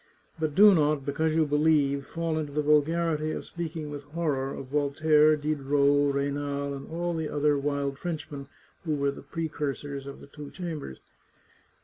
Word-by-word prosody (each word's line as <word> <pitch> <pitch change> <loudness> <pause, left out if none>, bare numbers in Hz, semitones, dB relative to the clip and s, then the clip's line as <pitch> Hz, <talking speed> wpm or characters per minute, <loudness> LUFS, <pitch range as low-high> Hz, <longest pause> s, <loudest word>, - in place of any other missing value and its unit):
But 155 -2 -1
do 205 +2 +8
not, 150 -4 +2
because 155 +3 0
you 160 -1 +3
believe, 145 -2 +2
fall 165 -1 -2
into 150 -2 -4
the 150 +1 -1
vulgarity 155 +1 +2
of - - -5
speaking 160 -3 -5
with 145 -1 -6
horror 145 -4 -2
of 135 - -6
Voltaire, 150 +2 +3
Diderot, 145 -1 +2
Raynal, 140 0 -2
and 135 0 -8
all 175 +1 -2
the 160 -2 -2
other 150 0 +2
wild 140 -1 -2
Frenchmen 150 -5 -5 0.4
who 155 -3 -1
were 140 -1 +1
the - - -10
precursors 145 -2 -4
of 140 - -8
the - - -12
two 145 0 -10
Chambers. 160 - -6
150 Hz, 160 wpm, -27 LUFS, 140-160 Hz, 0.4 s, do